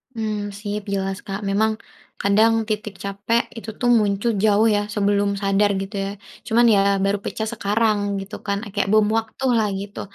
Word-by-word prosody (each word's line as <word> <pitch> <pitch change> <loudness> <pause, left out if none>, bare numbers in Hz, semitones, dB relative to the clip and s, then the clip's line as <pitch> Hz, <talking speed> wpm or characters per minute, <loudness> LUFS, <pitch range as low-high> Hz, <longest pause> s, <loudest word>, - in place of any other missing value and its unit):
Mmm, 210 -2 -3
sip 205 0 -4
jelas, 195 0 -2
Kak. 195 0 -3
Memang 215 +3 +2 0.5
kadang 215 +3 +4 0.2
titik 210 -1 -3
capek 200 +4 0 0.2
itu 225 - -7
tuh 245 - 0
muncul 205 +2 +1
jauh 215 +1 +4
ya - - +2 0.2
sebelum 205 -1 +2
sadar 200 +1 +2
gitu 195 +2 -6
ya, - - -3 0.4
cuman 235 +1 +4
ya - - +4 0.2
baru 200 +1 +1
pecah 220 - -3
sekarang 215 0 +1 0.2
gitu 195 +2 -8
kan, 200 0 0
eee, 215 - -8
kayak 200 -1 0
bom 215 -1 +5
waktu 225 +3 -4
lah 220 -2 +2
gitu. 200 +1 -7
205 Hz, 180 wpm, -22 LUFS, 200-220 Hz, 0.5 s, bom